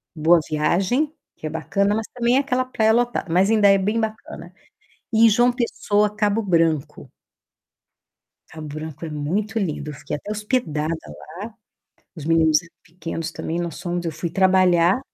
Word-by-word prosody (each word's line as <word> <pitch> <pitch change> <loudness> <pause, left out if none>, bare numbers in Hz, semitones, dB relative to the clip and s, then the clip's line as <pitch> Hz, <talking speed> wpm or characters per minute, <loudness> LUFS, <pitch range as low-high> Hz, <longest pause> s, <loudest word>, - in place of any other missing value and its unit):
Boa 165 +2 +4
Viagem, 195 - +1 0.2
que - - -10
é - - -2
bacana, 200 +6 0
mas 220 -1 -3
também 245 +1 +2
é - - +4
aquela 255 -2 0
praia 220 -3 +2
lotada, 240 -7 0
mas 190 +4 +3
ainda 215 -2 +5
é 195 0 +6
bem 210 +4 0
bacana. 215 -5 -6 0.6
E 225 +1 +6
João 240 +3 +4
Pessoa, 210 -4 0
Cabo 210 +1 +1
Branco. 160 -6 0 1.4
Cabo 155 -1 -9
Branco 155 +1 -7
é 160 - -5
muito 185 +10 -2
lindo, 155 -5 -3
eu - - -9
fiquei 150 +1 -5
até 205 - -8
hospedada 210 - -1 0.2
lá, - - -12 0.9
os 155 - -8
meninos 160 -1 +3
eram 170 -1 -19
pequenos 165 -1 -6
também. 165 +2 -4
Nós 170 -1 -4
fomos, 175 -1 -3
eu 165 - -1
fui 170 +2 -4
trabalhar 185 +1 +3
180 Hz, 165 wpm, -22 LUFS, 160-215 Hz, 1.4 s, é